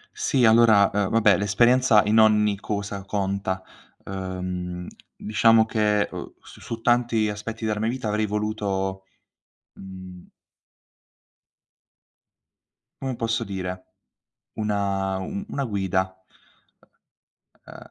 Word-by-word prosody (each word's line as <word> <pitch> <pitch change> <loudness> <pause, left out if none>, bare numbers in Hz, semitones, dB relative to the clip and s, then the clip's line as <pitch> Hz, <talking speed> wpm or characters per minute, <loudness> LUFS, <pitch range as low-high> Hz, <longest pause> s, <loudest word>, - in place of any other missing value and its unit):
Sì 135 - +1
allora, 110 -3 +5
uhm, 100 -2 0
vabbè, 105 -4 +4
l'esperienza 115 +2 +4
in 110 +2 +3
ogni 105 -2 +4
cosa 100 -2 -4
conta. 100 -1 -2 0.4
Uhm, 90 -2 -5 0.3
diciamo 110 +1 +3
che, 105 -2 +1
uhm, - - -8
su - - -16
su 115 -1 -6
tanti 120 -3 +2
aspetti 110 +2 -6
della 105 -1 -1
mia 110 +1 0
vita 125 -2 -4
avrei 105 0 0
voluto, 100 -2 -2 0.7
mhmm 95 -2 -11 2.8
come 130 -2 -3
posso 115 -1 -1
dire, 95 -1 -5 0.7
una 100 -2 -1
u 200 - -5
una 140 -10 -3
guida. 95 -4 -1 1.5
Uhm, - - -11
105 Hz, 105 wpm, -24 LUFS, 95-110 Hz, 2.8 s, allora